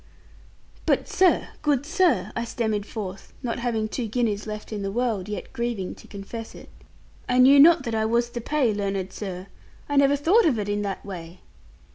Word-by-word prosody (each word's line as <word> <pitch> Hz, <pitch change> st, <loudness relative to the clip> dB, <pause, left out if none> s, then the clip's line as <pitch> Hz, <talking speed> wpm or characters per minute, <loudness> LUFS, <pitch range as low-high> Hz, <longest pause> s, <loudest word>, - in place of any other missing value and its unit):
'But -, -, +2 dB
sir, 370 Hz, -1 st, +3 dB
good 285 Hz, -3 st, +1 dB
sir,' 365 Hz, +1 st, +2 dB
I 230 Hz, -, -1 dB
stammered 220 Hz, -3 st, -2 dB
forth, 195 Hz, -3 st, -7 dB
not 240 Hz, -1 st, -2 dB
having 230 Hz, -3 st, -1 dB
two 230 Hz, +2 st, -3 dB
guineas 220 Hz, -2 st, -1 dB
left 210 Hz, +1 st, -6 dB
in 205 Hz, -, -3 dB
the 195 Hz, 0 st, -3 dB
world, 220 Hz, -4 st, -1 dB
yet 210 Hz, -, -6 dB
grieving 235 Hz, -6 st, -3 dB
to -, -, -15 dB
confess 220 Hz, +3 st, -8 dB
it, -, -, -12 dB, 0.6 s
'I 250 Hz, -, +2 dB
knew 265 Hz, +3 st, +7 dB
not 320 Hz, 0 st, +7 dB
that 230 Hz, -3 st, -3 dB
I 220 Hz, 0 st, +1 dB
was 235 Hz, +2 st, +1 dB
to 240 Hz, -, -5 dB
pay, 260 Hz, -3 st, +1 dB
learned 195 Hz, -2 st, -3 dB
sir. 185 Hz, -3 st, -6 dB, 0.4 s
I 285 Hz, -, -1 dB
never 280 Hz, 0 st, +5 dB
thought 340 Hz, +9 st, +4 dB
of 260 Hz, -7 st, +2 dB
it 205 Hz, -1 st, -3 dB
in 205 Hz, 0 st, 0 dB
that 200 Hz, -1 st, -4 dB
way.' 175 Hz, -2 st, -8 dB
225 Hz, 190 wpm, -25 LUFS, 205-255 Hz, 0.6 s, knew